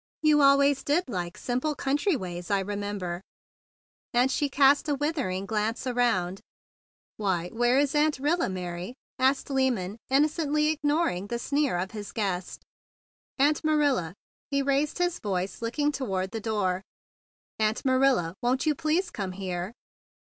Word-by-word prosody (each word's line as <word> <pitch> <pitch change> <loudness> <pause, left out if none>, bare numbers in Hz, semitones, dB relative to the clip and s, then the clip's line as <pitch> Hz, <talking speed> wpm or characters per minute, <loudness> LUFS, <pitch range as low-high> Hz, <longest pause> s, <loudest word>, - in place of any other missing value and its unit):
You 300 -1 +5
always 280 0 +5
did 325 +5 +1
like 175 -6 -4
simple 255 +5 -1
country 290 +8 +1
ways, 175 -6 -5
I 200 -1 +2
re¬ 205 +1 -4
member;" 200 -4 -4 0.9
and 250 +2 +4
she 290 +1 0
cast 280 +3 +4
a 290 - +2
withering 270 - -2
glance 220 +3 -1
around. 230 -8 0 0.8
"Why, 180 -4 -1
where 240 +4 +2
is 280 -1 +2
Aunt 300 0 +2
Rilla, 300 - +1
Mary?" 180 +3 -5 0.2
asked 265 +2 +2
Lyman, 235 -7 0
innocently 300 +2 +2
ignoring 295 - 0
the 235 - -2
sneer 280 -3 0
of 185 +2 -3
his 210 -2 -7
guest. 190 -5 -3 0.7
"Aunt 290 +3 +3
Marilla!" 285 - +1 0.3
he 280 0 +1
raised 280 +2 +1
his 355 -1 0
voice, 190 -1 -3
looking 290 +6 0
toward 195 -9 -2
the 225 -1 -4
door. 200 -4 0 0.8
"Aunt 215 +3 0
Marilla, 260 -10 +3
won't 250 +2 +1
you 305 - +3
please 330 +4 0
come 190 -3 -4
here?" 180 0 -4
250 Hz, 145 wpm, -27 LUFS, 195-290 Hz, 0.9 s, You